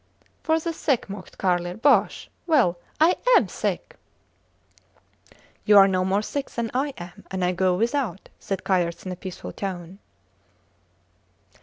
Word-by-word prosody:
For 320 -1 +2
the 330 +1 -3
sick, 270 -10 -1
mocked 195 -2 -10
Carlier. 175 -1 0
Bosh!... 275 +6 +2 0.2
Well! 240 - +3 0.2
I 325 +3 +4 0.2
am - - +2
sick. - - -4 1.7
You 210 - +6
are 195 0 +9
no 185 -1 +1
more 195 +3 +1
sick 280 +4 -4
than 230 -1 -3
I 275 +2 -1
am, 175 0 -10
and 190 -1 -1
I 180 - +2
go 185 0 +1
without, 230 - -1
said 195 -2 -4
Kayerts 175 -3 0
in 185 - -4
a - - -4
peaceful 185 0 -8
tone. 185 -1 -6
195 Hz, 145 wpm, -24 LUFS, 180-255 Hz, 1.7 s, are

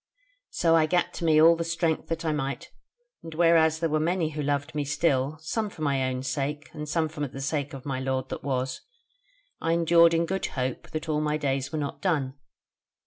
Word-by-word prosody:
So 165 -1 +2
I 160 -1 +4
gat 180 +2 +1
to 170 - -4
me 155 -1 +5
all 165 +2 +7
the 165 - -2
strength 165 -1 -1
that 165 0 -3
I 160 - +1
might, 140 -2 -3 0.5
and 165 -1 -9
whereas 165 -1 +4
there 165 0 0
were 155 0 +1
many 165 0 0
who 150 -1 -4
loved 145 +1 -1
me 150 -1 -1
still, 145 0 0
some 215 +7 -2
for 160 - -8
my 135 -3 +1
own 130 0 -3
sake, 140 +3 -3
and 150 -1 -6
some 160 0 +1
for 150 -2 -4
the 135 +1 -9
sake 145 0 -2
of 135 - -10
my 135 -2 -2
lord 130 0 -2
that - - -6
was, 130 -1 -2 0.8
I 165 - +1
endured 170 0 +5
in 165 +1 +2
good 190 +2 -2
hope 130 -2 -4
that 155 +1 -5
all 150 -1 0
my 150 0 0
days 140 -1 -1
were 155 - -3
not 145 -2 -4
done. 150 -9 0
155 Hz, 215 wpm, -27 LUFS, 140-165 Hz, 0.8 s, all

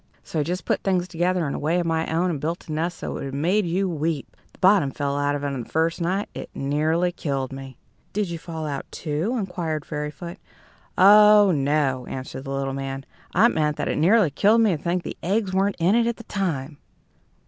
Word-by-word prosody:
So 160 - -3
I - - +2
just 180 +4 -3
put - - 0
things 185 -2 0
together 175 -1 0
in 140 - -3
a - - -3
way 165 +4 +1
of 175 - -1
my 160 -1 -1
own, 175 +3 +1
and 150 -5 -4
built 165 +3 -3
a - - -6
nest 165 +3 -2
that - - -4
would - - -5
have 135 0 -5
made 180 +7 +1
you 190 +3 0
weep! 160 -3 -3 0.2
The - - -22
bottom 185 -6 +4
fell 140 +1 -2
out 145 0 0
of 145 - -4
it 145 - -1
the 120 -3 -6
first 165 +2 0
night. 190 +4 0
It - - -7
nearly 155 +5 +1
killed 135 -6 -3
me." 135 -2 -9 0.3
"Did 210 -1 -1
you 170 - -4
fall 160 -2 -6
out, 145 -2 -4
too?" 160 +10 -2
inquired 170 -7 -3
Fairyfoot. 150 +3 -6 0.6
"Oh, 210 +1 +7
no," 140 -4 0
answered 130 +1 -6
the - - -6
little 135 0 -2
man. 135 0 -5 0.3
"I 210 +7 +6
meant 150 -5 0
that - - -2
it - - -1
nearly 185 +1 +4
killed 210 +9 +4
me 210 -6 +3
to 150 - -8
think 175 +1 -1
the - - -6
eggs 195 +1 0
weren't 195 +1 +1
in 175 +4 +3
it 235 0 +3
at 235 - -1
the 230 - -10
time." 160 -9 -3
165 Hz, 225 wpm, -24 LUFS, 145-185 Hz, 0.6 s, Oh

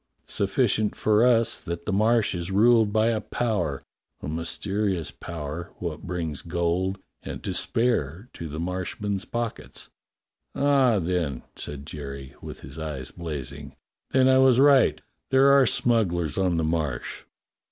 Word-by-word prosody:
Sufficient 105 +1 +1
for 110 +1 +3
us 115 -2 +3
that 85 -1 -5
the - - -1
Marsh 110 +2 +3
is 85 0 -4
ruled 110 +2 +4
by 110 +2 +3
a 110 -2 0
power, 95 - -2 0.4
a - - -7
mysterious 90 +3 -2
power, 85 +1 -6
wot 80 -3 -4
brings 80 -5 -3
gold 85 +2 -1 0.2
and - - -7
to - - -2
spare 110 - 0
to 80 - -7
the 75 +2 -5
Marshmen's 95 +3 -3
pockets." 120 -1 -5 0.7
"Ah, 135 -5 +4
then," 85 -7 -1
said 70 -1 -7
Jerry, 70 -3 -7
with - - -9
his - - -9
eyes 70 -5 -5
blazing, 70 -4 -7 0.3
"then 130 0 +4
I 130 0 +5
was 130 -2 +5
right. 140 -2 +5 0.3
There 135 +1 +5
are 140 -2 +6
smugglers 90 - +1
on 95 -3 +1
the 80 - +1
Marsh." 80 -6 -2
90 Hz, 140 wpm, -25 LUFS, 80-115 Hz, 0.7 s, are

